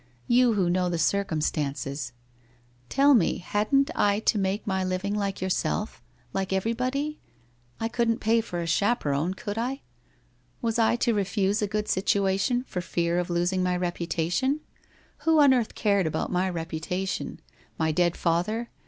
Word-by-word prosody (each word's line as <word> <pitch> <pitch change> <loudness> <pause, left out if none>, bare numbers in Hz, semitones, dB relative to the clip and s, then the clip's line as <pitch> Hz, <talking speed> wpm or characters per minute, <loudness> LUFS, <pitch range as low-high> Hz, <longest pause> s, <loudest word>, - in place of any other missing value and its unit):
You 245 -1 +4
who 190 -4 +1
know 180 +1 +1
the 170 - -1
circumstances! 150 -7 -1 0.8
Tell 280 +1 +5
me, 235 - +3
hadn't 215 - +1
I 205 0 +2
to 220 - +2
make 195 +2 -1
my 190 -2 0
living 185 +2 -2
like 200 -2 -2
yourself, 180 - -1 0.3
like 195 -1 -2
everybody? 255 +9 -1 0.6
I 225 - 0
couldn't 230 -1 +1
pay 225 +1 +2
for 175 -6 -5
a - - -3
chaperon, 165 -3 +1
could 205 +2 -4
I? 260 +4 -2 0.8
Was 230 -1 -1
I 225 +1 +4
to 240 -1 +1
refuse 200 +1 0
a 210 - +1
good 210 +1 -2
situation, 195 +6 +1
for 180 -8 -4
fear 170 0 0
of 180 - -2
losing 175 +2 +1
my 180 0 +1
reputation? 175 - -1 0.6
Who 320 -1 +3
on 285 -3 +7
earth 240 -4 0
cared 200 -5 +2
about 155 - -2
my 185 +1 +1
reputation? 175 +2 -3 0.4
My 160 -1 +1
dead 175 +2 +1
father? 185 +8 0
195 Hz, 155 wpm, -26 LUFS, 175-230 Hz, 0.8 s, on